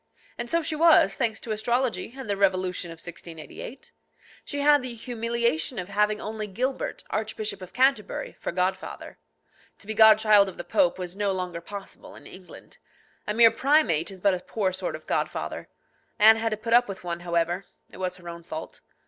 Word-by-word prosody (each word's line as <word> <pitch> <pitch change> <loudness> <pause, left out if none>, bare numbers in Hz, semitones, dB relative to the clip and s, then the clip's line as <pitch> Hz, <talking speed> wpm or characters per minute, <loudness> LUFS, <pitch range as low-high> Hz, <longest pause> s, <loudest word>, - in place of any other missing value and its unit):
And 240 0 -5
so 335 0 +1
she 315 0 -2
was, 310 -11 +5
thanks 225 -4 -1
to 225 - -6
astrology 240 +2 -1
and 265 - -7
the 200 - 0
revolution 185 -2 0
of 165 - -8
1688. 170 - -9 0.5
She 285 -1 -4
had 290 -1 +5
the 250 -2 -4
humiliation 235 -3 -1
of 180 +1 -4
having 210 +1 +1
only 215 0 -5
Gilbert, 255 +7 -3
Archbishop 215 -2 -3
of 185 -1 -9
Canterbury, 255 -2 +1
for - - -3
godfather. 185 +2 -3 0.6
To - - -15
be 220 - -3
godchild 215 -2 +6
of 190 - -12
the - - -5
Pope 275 +1 +2
was 180 -1 -5
no 205 -1 0
longer 180 -2 -4
possible 200 +2 -10
in - - -14
England. 185 -1 -14 0.5
A 210 - 0
mere 230 -1 +7
primate 275 - +2
is 190 -1 -8
but 200 0 +4
a 180 - -2
poor 190 0 -2
sort 185 - -3
of - - -11
godfather. - - -3 0.5
Anne 220 +1 +7
had 225 0 0
to 215 - -3
put 230 +2 -2
up 245 +1 +6
with 195 -2 -7
one, 170 -1 -4
however. 175 +2 -1 0.3
It - - -12
was 185 -1 -3
her 175 -1 -13
own 170 0 -7
fault. 160 -2 -8
210 Hz, 190 wpm, -26 LUFS, 185-235 Hz, 0.6 s, mere